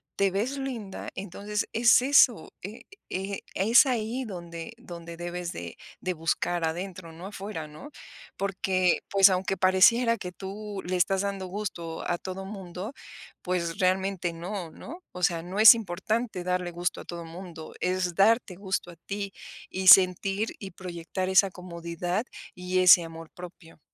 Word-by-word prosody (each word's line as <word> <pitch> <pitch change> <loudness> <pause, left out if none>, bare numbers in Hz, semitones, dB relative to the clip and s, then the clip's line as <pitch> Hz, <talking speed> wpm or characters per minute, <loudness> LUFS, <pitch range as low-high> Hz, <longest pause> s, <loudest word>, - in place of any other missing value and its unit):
te 200 0 +2
ves 225 +9 -1
linda, 240 -8 -5
entonces 205 +2 -4
es 235 +2 +5
eso. 255 - +4
Eh, 210 +5 -8 0.3
eh, 195 +1 -4
es 225 +9 +6
ahí 245 0 -1
donde 170 -2 -7
donde 170 -7 -10
debes 175 0 -4
de - - -8 0.2
de 185 - -2
buscar 165 +1 -1
adentro, 175 +1 -4
no 170 +4 -9
afuera, 195 -5 -6
¿no?, 155 - -12 0.5
porque, 185 -2 +1
pues 195 0 +7
aunque 190 +1 0
pareciera 230 +6 +4
que 180 -3 -6
tú 200 +2 -7
le 185 +1 -1
estás 190 +2 +2
dando 200 -2 -3
gusto 180 -4 -5
a 175 - +1
todo 190 +2 -6
mundo, 190 +2 -7 0.5
pues 170 -2 -2
realmente 185 -1 +1
no, 175 +1 -5
¿no? 340 - -10
O 180 - -8
sea, 170 -1 +2
no 185 +4 -5
es 220 +2 +11
importante 215 0 -3
darle 180 0 -1
gusto 175 +1 -2
a - - -13
todo 170 -1 -7
mundo. 165 -1 -9
Es 180 -1 0
darte 205 0 +3
gusto 190 -2 -3
a - - -14
ti, 200 +3 -6 0.4
y 190 0 -3
sentir, 195 +3 +6
y 195 -2 -8
proyectar 180 +1 -5
esa 190 +1 +5
comodidad 175 +3 -4 0.3
y 180 0 -1
ese 180 -1 +8
amor 165 -1 -9
propio. 175 -2 -12
185 Hz, 155 wpm, -27 LUFS, 175-200 Hz, 0.5 s, es